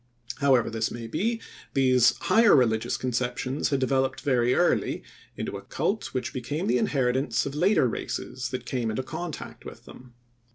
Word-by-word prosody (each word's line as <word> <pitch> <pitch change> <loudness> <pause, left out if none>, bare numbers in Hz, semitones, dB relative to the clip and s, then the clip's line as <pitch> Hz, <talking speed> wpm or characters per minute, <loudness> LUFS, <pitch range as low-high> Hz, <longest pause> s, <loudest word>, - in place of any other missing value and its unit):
However 135 -5 +3
this 110 0 -1
may 120 -1 -7
be, 225 - -1 0.4
these 130 -3 +4
higher 230 -1 +5
religious 115 -5 +2
conceptions 125 +2 -1
had 140 -2 +1
developed 130 0 0
very 125 -3 +2
early 175 - +1 0.3
into - - -4
a - - -9
cult 210 +2 -2
which 130 - -3
became 130 +5 -3
the 125 +2 +2
inheritance 130 0 +1
of 140 - -4
later 175 -1 +3
races 125 +1 -4
that 130 0 -5
came 120 -3 -2
into 110 +4 -2
contact 170 +4 -7
with - - -11
them. 125 -1 -14
130 Hz, 160 wpm, -26 LUFS, 120-140 Hz, 0.4 s, higher